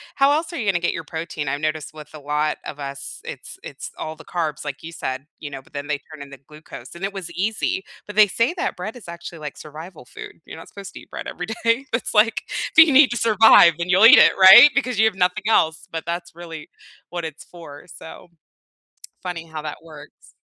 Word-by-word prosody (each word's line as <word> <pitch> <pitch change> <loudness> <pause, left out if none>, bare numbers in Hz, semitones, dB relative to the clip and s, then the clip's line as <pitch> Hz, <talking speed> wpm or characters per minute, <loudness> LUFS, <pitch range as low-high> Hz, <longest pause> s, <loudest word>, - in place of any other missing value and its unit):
how 275 +1 +4
else 320 +3 -1
are - - -5
you 225 - -3
gonna 190 -3 +1
get 175 - -1
your - - -6
protein? 160 -2 -6
I 145 - -2
noticed 155 0 -4
with 150 -1 -13
a 155 - -10
lot 150 +1 -1
of 145 - -8
us, 140 -1 -7
it's - - -9
it's - - -9
all 155 0 -6
the 160 - -15
carbs, 160 -4 -3
like 145 -2 -7
you 165 - -8
said, 130 -3 -5
you 145 - -7
know, 135 -1 -8
but 135 - -26
then 145 +1 -6
they 150 - -1
turn 155 -1 -14
into 140 -1 -11
glucose, 150 0 -13
and 180 - -10
it 195 - -2
was 190 -3 -7
easy, 200 0 -2 0.2
but 210 - -9
they 215 -1 +6
say 230 - 0
that - - -3
bread 210 +6 -6
is 240 - -13
actually 170 -1 -9
like 150 -2 -8
survival 155 +1 -11
food; - - -12
you're - - -10
not 165 - -12
supposed 200 -1 -11
to - - -10
eat - - -18
bread - - -7
everyday, 230 +6 -2
it's 230 - -2
like, 225 +1 +3 0.3
do 315 - +12
you 315 -3 0
need 270 0 +7
to 240 - -2
survive, 220 -6 +6
then 170 +1 -4
you'll 190 +4 +5
eat 245 +6 +9
it, - - +7
right? 190 +10 +10
Because 255 -4 -1
you 220 - +5
have 220 -4 +1
nothing 180 +1 0
else, 160 -7 +1
but 165 -1 -5
that's 170 +1 -5
really 165 -3 -10 0.4
what 175 -1 -5
it's 160 -1 -8
for, 165 -4 -13
so. 165 +1 -13 0.9
Funny 170 -2 -6
how 155 -1 -8
that - - -6
works. 155 -2 -15
170 Hz, 235 wpm, -21 LUFS, 150-210 Hz, 0.9 s, do